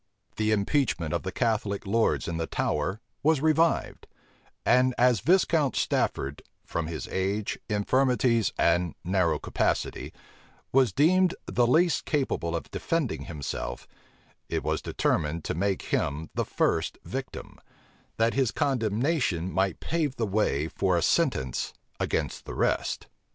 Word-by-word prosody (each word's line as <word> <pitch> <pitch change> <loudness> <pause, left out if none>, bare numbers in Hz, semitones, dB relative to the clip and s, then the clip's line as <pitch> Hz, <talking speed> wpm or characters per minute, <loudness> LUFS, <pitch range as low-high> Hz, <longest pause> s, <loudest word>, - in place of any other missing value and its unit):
The 110 0 +1
impeachment 100 - +1
of 85 - 0
the 95 - -4
Catholic 110 -4 -1
lords 110 +3 +1
in 85 - -2
the 80 0 -2
Tower 85 +7 -1 0.2
was 155 0 +3
revived; 160 +2 +1 0.6
and 125 +1 +4
as 125 -3 +4
Viscount 165 - +3
Stafford, 70 +2 0 0.2
from 85 -1 -3
his 80 -2 -5
age, 100 +2 -1
infirmities, 115 +1 +2
and 85 0 +2
narrow 90 -3 +2
capacity, - - -1 0.6
was 130 -2 +4
deemed 185 +5 +3
the 120 -1 +2
least 165 +7 +3
capable 130 - -1
of 85 - -5
defending 165 -6 -2
himself, 70 -5 -5 0.6
it - - -1
was - - -1
determined 80 +1 -1
to - - -2
make 95 +3 -1
him 75 +3 -1
the - - -1
first - - 0
victim, - - -6 0.6
that 115 +1 +2
his 130 -3 +2
condemnation 115 - 0
might 95 -1 0
pave 155 -5 -1
the 115 - -1
way 95 -8 +1
for 90 +1 +1
a 85 - +1
sentence 125 - 0 0.2
against - - -2
the - - -6
rest. - - 0
110 Hz, 135 wpm, -27 LUFS, 85-135 Hz, 0.6 s, and